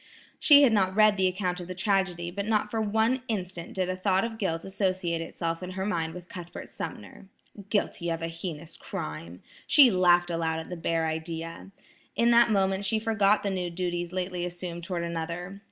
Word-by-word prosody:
She 290 -1 +8
had 250 -5 +5
not 190 -3 +2
read 215 -1 +6
the 190 -1 +2
account 180 -1 -2
of 175 - -7
the 185 - -6
tragedy, 190 -3 0
but 200 +3 -4
not 215 -1 +1
for 225 - 0
one 220 +4 +1
instant 185 -5 -4
did 185 -1 0
a 185 - -2
thought 190 0 +1
of 225 -1 -6
guilt 165 -5 -2
associate 185 -3 -1
itself 165 0 -4
in 180 - -5
her 190 - -1
mind 165 -5 -2
with 180 -1 -9
Cuthbert 175 -1 -8
Sumner. 105 - -8 0.4
Guilty 200 -4 -1
of 165 0 -2
a - - -1
heinous 165 -1 -7
crime! 85 +3 -7 0.2
She 275 -5 +7
laughed 175 -2 +4
aloud 165 -1 -1
at 160 +2 -7
the - - -3
bare 165 -1 0
idea. 165 +2 -5 0.5
In 235 +1 +3
that 235 0 +6
moment 195 -1 +1
she 210 +3 +1
forgot 215 -2 +2
the 200 - 0
new 180 -2 -2
duties 175 0 -3
lately 180 -1 -3
assumed 175 -1 -5
toward 175 -1 -3
another. 170 +3 -4
180 Hz, 195 wpm, -27 LUFS, 170-200 Hz, 0.5 s, She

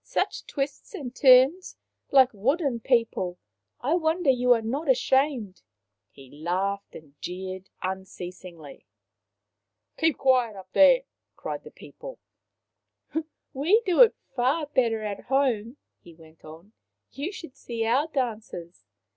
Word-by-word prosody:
Such - - -2
twists 280 +7 -4
and 260 -8 -7
turns! 265 +7 +5 0.3
Like 265 -2 +5
wooden 265 - 0
people! 230 -7 0 0.4
I 280 +6 0
wonder 325 -2 +2
you 250 -1 +1
are 230 - 0
not 275 +7 -3
ashamed." 260 -5 +1 0.5
He 135 -2 -16
laughed 185 +6 -3
and 150 -3 -13
jeered 185 +1 -6
unceas 185 -1 -6
ingly. 165 -6 -12 0.5
" 100 0 -56
Keep 320 -2 +2
quiet 250 -5 +2
up 190 -1 -12
there! - - +6 0.2
" - - -58
cried - - -5
the - - -11
people. - - -11 0.7
" - - -58 0.5
We 345 - +3
do 365 +3 +4
it 470 - +7 0.2
far 270 +5 +1
better 235 -6 0
at 205 -2 -5
home/' 250 -3 0 0.2
he 170 -2 -16
went 160 -1 -19
on. 165 +7 -13 0.2
" - - -56
You 285 +8 -4
should 330 -8 -10
see 230 -4 -4
our 260 +7 +2
dances 215 - -5
245 Hz, 140 wpm, -26 LUFS, 185-280 Hz, 0.7 s, it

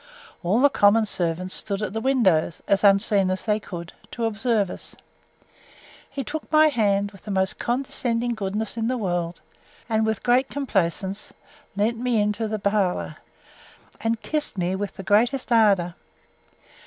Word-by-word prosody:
All 185 +6 +1
the 285 - +6
common 215 0 +4
servants 180 -2 -2
stood 205 -1 -3
at 200 - -3
the 225 - -2
windows, 195 -12 +2
as 200 +1 +2
unseen 200 -1 +4
as 185 0 -2
they 215 -1 +1
could, 170 -4 -8 0.2
to 235 - -3
observe 220 -3 0
us. - - -9 1.1
He 275 0 -4
took 300 +6 -6
my 310 0 +6
hand, 205 -6 +1
with 195 - -16
the - - -9
most 190 -1 0
condescending 240 -1 -1
goodness 215 +1 -3
in 225 0 0
the 255 +1 0
world; 175 -5 -2 0.5
and, 220 -1 +1
with 220 -1 -1
great 250 +2 +3
complaisance, 195 -7 -2 0.4
led 215 +3 +1
me 240 -1 0
into 210 +2 0
the 215 0 -2
parlour, 195 - 0 0.8
and 225 0 -1
kissed 300 -8 -2
me 180 +1 0
with 200 +1 -4
the 195 - -6
greatest 240 +7 +2
ardour. 200 -7 +4
210 Hz, 155 wpm, -24 LUFS, 190-235 Hz, 1.1 s, the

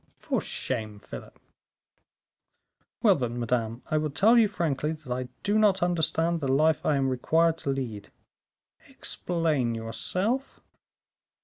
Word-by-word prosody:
"For - - -1
shame, 110 -5 -4
Philip." - - -11 1.6
"Well, 210 -4 +7
then, 120 -6 -2
madame, 115 0 -1
I 155 - +3
will 155 0 -1
tell 200 - +4
you 230 -3 +6
frankly 160 -6 -1
that 150 -5 -6
I 125 0 -4
do 205 +1 +2
not 195 -4 +3
understand 165 -1 +1
the 140 - -2
life 155 +3 +3
I 150 - +3
am 135 -1 +1
required 160 +6 +2
to - - -4
lead." 120 -7 -3 0.8
"Explain 155 -9 -1
yourself." 185 - -2
155 Hz, 130 wpm, -27 LUFS, 125-175 Hz, 1.6 s, Well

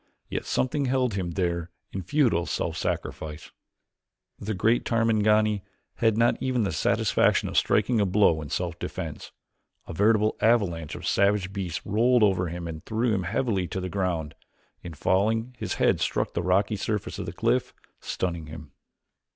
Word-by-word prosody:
Yet - - -3
something 140 +2 0
held 125 -3 +1
him 90 -3 -3
there 85 -2 -1 0.2
in 95 - -4
futile 115 - +1
self - - -2
sacrifice. 75 -1 -4 0.9
The 105 +1 -3
great 115 +6 +2
Tarmangani 110 -2 +2 0.4
had 110 -2 +2
not 115 +1 +2
even 125 -3 +1
the 95 - -1
satisfaction 75 - +2
of - - -6
striking 110 +1 +2
a - - +3
blow 95 -5 +3
in 75 - -7
self 70 - -3
defense. - - -6 0.6
A - - -6
veritable 105 +4 +2
avalanche 90 -9 +1
of - - -8
savage 100 -1 +2
beasts 95 -4 -4
rolled 115 +3 +3
over 95 -3 +2
him 85 +1 -5
and 80 -1 -7
threw 115 +1 0
him 95 - 0
heavily 100 -2 0
to 95 - -4
the 90 0 -4
ground. 90 -6 -2 0.5
In 85 -2 -8
falling 110 - +1
his - - -3
head - - +2
struck - - -1
the 85 - -1
rocky 95 +4 +1
surface 105 +1 -3
of - - -5
the - - -3
cliff, - - 0 0.3
stunning 85 -4 -3
him. 75 -2 -10
100 Hz, 165 wpm, -26 LUFS, 85-115 Hz, 0.9 s, a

